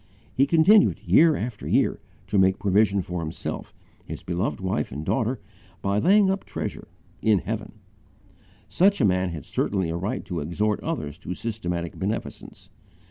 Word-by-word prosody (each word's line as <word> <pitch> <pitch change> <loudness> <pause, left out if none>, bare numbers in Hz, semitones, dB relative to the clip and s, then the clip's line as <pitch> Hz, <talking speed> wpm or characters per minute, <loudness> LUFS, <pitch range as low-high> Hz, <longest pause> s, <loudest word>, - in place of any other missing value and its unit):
He 135 +2 +3
continued, 180 +7 +5
year 160 -1 +5
after 115 -3 -5
year, - - +2 0.3
to 100 +1 +1
make 95 0 +4
provision 100 -1 +2
for 90 +1 -4
himself, 80 0 -5 0.3
his - - -8
beloved 90 +1 -2
wife 95 -1 -2
and 75 +4 -6
daughter, 125 +2 0 0.4
by 100 +1 +1
laying 195 - +5
up 195 0 -2
treasure - - -6 0.3
in 110 -2 +4
heaven. 105 +2 -4 0.9
Such 195 - +3
a - - +4
man 95 -1 +2
had 80 -5 -7
certainly 95 -5 -1
a - - -3
right 95 +5 -3
to 90 -3 -4
exhort 100 +8 -1
others 90 - -4
to 90 -1 -5
systematic 90 -7 -4
beneficence. 105 +4 -5
100 Hz, 155 wpm, -25 LUFS, 90-120 Hz, 0.9 s, continued